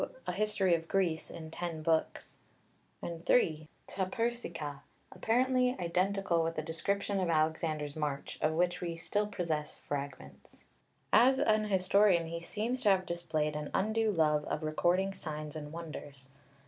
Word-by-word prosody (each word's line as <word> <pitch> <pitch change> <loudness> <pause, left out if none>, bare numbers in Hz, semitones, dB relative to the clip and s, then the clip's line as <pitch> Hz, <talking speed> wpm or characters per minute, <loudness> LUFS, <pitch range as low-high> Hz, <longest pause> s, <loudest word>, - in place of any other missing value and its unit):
12); - - -3
(2) - - -18
a - - -1
History 195 -1 +2
of 165 -1 0
Greece 175 -5 0
in 160 -1 -8
ten 165 -2 -4
books; 160 0 -1 0.6
(3) 165 -2 +1 0.2
τὰ 190 -1 -2
Περσικά, 180 -11 -3 0.3
apparently 250 +2 +2
identical 180 0 +1
with 165 0 -1
the 155 - -2
description 200 +5 -1
of 180 -2 0
Alexander's 155 -2 0
march, 150 -3 -3
of 155 - +2
which 175 +2 +1
we 170 -2 -3
still 205 +5 -1
possess 160 -6 -3
fragments. 140 - -7 0.5
As 265 +2 +6
an 215 -4 +3
historian 190 -2 +4
he 170 0 -4
seems 225 +8 -2
to 210 - +4
have 190 -1 +3
displayed 155 -3 -1
an 150 -1 -4
undue 220 +2 +2
love 155 -4 +2
of 155 - -3
recording 175 +5 +1
signs 155 -3 -6
and 150 -1 -6
wonders. 145 -4 -8
170 Hz, 150 wpm, -32 LUFS, 155-200 Hz, 0.6 s, As